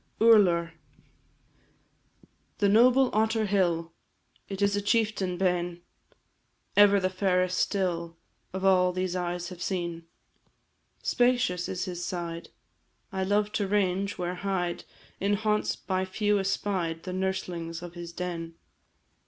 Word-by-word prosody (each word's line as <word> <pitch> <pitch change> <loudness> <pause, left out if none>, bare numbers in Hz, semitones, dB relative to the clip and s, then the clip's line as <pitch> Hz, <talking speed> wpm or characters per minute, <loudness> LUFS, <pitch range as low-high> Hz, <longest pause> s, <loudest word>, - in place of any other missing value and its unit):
URLAR. 180 -7 +5 1.8
The 205 - +2
noble 250 +5 +5
Otter 220 0 +2
hill! 170 -5 0 0.6
It 195 -1 -5
is 200 0 +2
a 205 - 0
chieftain 205 -4 0
Beinn, 175 -2 0 0.9
Ever 205 0 +6
the 185 - +1
fairest 185 -1 +1
still 170 -4 -1 0.3
Of 190 +1 -3
all 180 -1 +4
these 185 0 -2
eyes 175 -1 -3
have 180 -2 -10
seen. 170 -3 -3 1.0
Spacious 245 -8 +1
is 185 0 -3
his 175 -2 -5
side; 170 -2 -5 0.6
I 190 -1 -2
love 205 +2 +1
to 205 -2 -1
range 195 -1 0
where 180 0 -2
hide, 180 -3 -2 0.3
In 200 +1 +1
haunts 210 0 0
by 185 -1 -2
few 205 +2 +1
espied, 190 -4 -1
The 185 - -5
nurslings 180 -3 -3
of 175 -1 -8
his 170 -1 -8
den. 170 -1 -5
185 Hz, 125 wpm, -28 LUFS, 175-205 Hz, 1.8 s, Ever